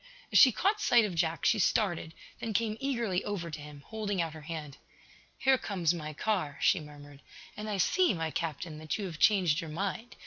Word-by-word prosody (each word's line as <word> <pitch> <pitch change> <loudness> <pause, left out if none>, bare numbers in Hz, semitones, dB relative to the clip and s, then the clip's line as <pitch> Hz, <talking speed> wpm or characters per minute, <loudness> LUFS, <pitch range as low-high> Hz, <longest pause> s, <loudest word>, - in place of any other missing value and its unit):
As - - +6
she 260 - +9
caught 405 - +1
sight 240 - +5
of 200 - -3
Jack 165 -1 -1
she 220 - +4
started, 175 -5 +1 0.2
then 225 - -4
came 215 0 +1
eagerly 235 -9 -1
over 180 -5 -4
to 155 - -6
him, 145 -1 -11
holding 210 -3 -3
out 165 -2 -1
her 155 - -10
hand. 150 -3 -7 0.6
"Here 265 -1 +3
comes 180 -7 0
my 155 -3 -5
car," 155 -3 -1
she 190 - +3
murmured. 145 -2 -12 0.3
"And 215 +1 -6
I 205 - -1
see, 365 - +3
my 160 -1 -2
Captain, 155 0 -4
that 155 -1 -3
you 205 - -4
have 165 -4 -7
changed 180 -7 +4
your 165 - -7
mind. 195 +8 -4
175 Hz, 205 wpm, -30 LUFS, 155-215 Hz, 0.6 s, she